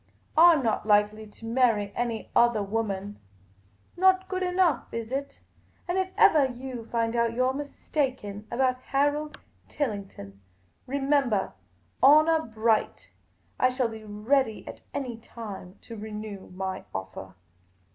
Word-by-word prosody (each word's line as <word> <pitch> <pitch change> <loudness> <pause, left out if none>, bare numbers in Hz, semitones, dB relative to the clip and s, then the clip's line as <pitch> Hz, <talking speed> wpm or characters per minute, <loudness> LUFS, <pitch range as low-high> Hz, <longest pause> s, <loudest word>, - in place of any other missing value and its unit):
I 340 +2 +8
'm 295 -5 0
not 220 -2 -1
likely 210 +1 +2
to 215 +2 -13
marry 225 -4 +2
any 235 -2 -3
othah 235 -3 +4
woman 205 -1 -3 0.4
— 100 +1 -35
not 375 0 +5
good 375 0 -3
enough, 360 -6 +1
is 230 0 -5
it? 275 +1 -4 0.2
— - - -36
and 355 +2 0
if 375 0 -1
evah 285 -4 +6
you. 255 -2 -6
find 230 0 -1
out 235 -1 +1
you 255 +1 +2
're 260 - +1
mistaken 260 -7 -3
about 255 +1 0
Harold 290 +3 0 0.3
Tillington, 195 - -5 0.5
remembah, 270 -6 +1 0.5
honour 310 +1 +6
bright, 220 0 0 0.5
I 255 - +4
shall 255 -2 0
be 220 -1 -9
ready 220 +3 0
at - - -9
any 250 -4 -4
time 205 -5 -9
to 230 - -9
renew 210 -2 -7
my 190 0 -5
ofFah." 95 -1 -7
230 Hz, 140 wpm, -27 LUFS, 210-275 Hz, 0.5 s, I